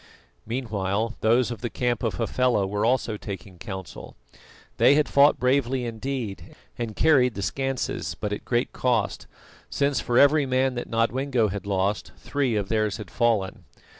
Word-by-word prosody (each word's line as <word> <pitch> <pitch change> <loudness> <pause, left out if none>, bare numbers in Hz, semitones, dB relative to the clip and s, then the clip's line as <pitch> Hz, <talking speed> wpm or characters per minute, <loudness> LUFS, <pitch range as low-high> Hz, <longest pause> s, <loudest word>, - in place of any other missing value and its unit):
Meanwhile, 110 -3 -2
those 120 +3 +3
of 115 -3 -6
the 120 - -2
camp 120 -2 -1
of 110 -7 -1
Hafela 125 -1 +1
were 105 +2 -2
also 115 -2 +1
taking 95 -3 -8
counsel. 95 -3 -8 0.6
They 140 - +6
had 150 -1 +3
fought 140 +1 +5
bravely 130 -1 +1
indeed, 115 -6 -5 0.2
and 115 -3 -4
carried 130 -7 +4
the 100 - -4
schanses; 135 +3 -2
but 105 -1 -2
at - - -5
great 120 0 -1
cost, 115 -5 0 0.4
since 140 -1 +1
for 120 - 0
every 145 +1 +5
man 130 0 +1
that 120 - -5
Nodwengo 115 0 +1
had 100 +1 -5
lost, 100 +1 -1
three 135 -5 -1
of 100 -2 -1
theirs 110 0 0
had 105 -6 -9
fallen. 115 -6 0
120 Hz, 160 wpm, -25 LUFS, 105-130 Hz, 0.6 s, They